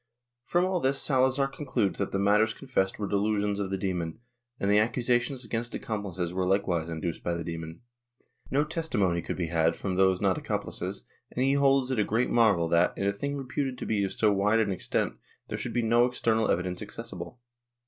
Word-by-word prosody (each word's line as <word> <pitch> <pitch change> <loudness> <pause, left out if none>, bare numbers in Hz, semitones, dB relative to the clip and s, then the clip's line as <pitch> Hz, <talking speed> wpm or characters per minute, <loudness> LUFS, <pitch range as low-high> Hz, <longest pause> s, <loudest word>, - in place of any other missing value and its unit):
From 175 +1 +2
all 185 -1 0
this 135 -2 +1
Salazar 130 0 +3
concludes 135 -8 -2
that 100 - -1
the - - 0
matters 105 +3 +3
confessed 110 -9 -1
were 105 - -2
delusions 105 0 0
of 100 -2 -2
the 95 - -1
demon, 90 -4 -2 0.4
and 100 - -1
the 105 +1 +5
accusations 120 +3 0
against 115 +1 -3
accomplices 95 -5 -3
were 95 0 0
likewise 90 -4 +1
induced 80 0 -4
by 85 - -1
the 85 - -4
demon. 80 +1 -6 0.7
No 145 +2 +2
testimony 120 - 0
could - - -4
be 85 -3 -2
had 80 0 +3
from 95 -2 -3
those 95 -1 +4
not 95 -3 +1
accompUces 65 - -3 0.3
and 125 - -1
he 135 - +3
holds 135 -2 +3
it 130 - 0
a - - +4
great 115 +5 0
marvel 105 -8 +4
that, 85 +1 +3
in 100 - -1
a 100 - +2
thing 140 +7 -3
reputed 135 0 -3
to - - -5
be 105 -2 +1
of 95 - -1
so 105 -2 +2
wide 105 +3 +2
an 110 -3 +2
extent, 95 - -1 0.3
there - - -3
should - - -4
be 120 - +1
no 120 +2 +4
external 115 -3 +1
evidence 90 0 -1
accessible. 115 0 -8
105 Hz, 200 wpm, -28 LUFS, 95-125 Hz, 0.7 s, the